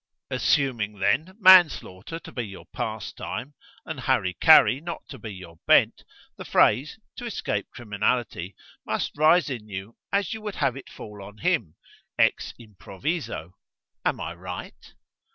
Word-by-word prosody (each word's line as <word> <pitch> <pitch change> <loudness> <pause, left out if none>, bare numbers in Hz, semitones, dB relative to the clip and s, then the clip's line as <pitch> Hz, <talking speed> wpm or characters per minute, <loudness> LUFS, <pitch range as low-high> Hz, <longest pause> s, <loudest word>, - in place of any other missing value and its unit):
Assuming, 115 -7 +1
then, 125 - 0
manslaughter 170 - +5
to - - -11
be 125 - -3
your 100 -4 -9
pastime, 125 +9 -5 0.3
and 160 -4 -6
hari 120 -8 +1
kari 130 +9 +6
not 170 +1 -6
to 135 - -9
be 110 - -7
your 85 -4 -11
bent, - - +4 0.3
the - - -7
phrase, 135 - +3 0.2
to 245 - -6
escape 105 - -3
criminality, 105 -4 -2 0.3
must - - -2
rise 155 +4 +4
in 110 -4 -6
you 100 +3 -7 0.2
as 200 -2 0
you 220 - -6
would 210 -2 -5
have 135 -3 0
it 135 - -10
fall 105 -1 -10
on 100 +2 -11
him, 120 - 0 0.4
ex - - +2
improviso. 105 - -5 0.5
Am - - 0
I - - -4
right?" 90 +1 -9
120 Hz, 145 wpm, -25 LUFS, 100-155 Hz, 0.5 s, kari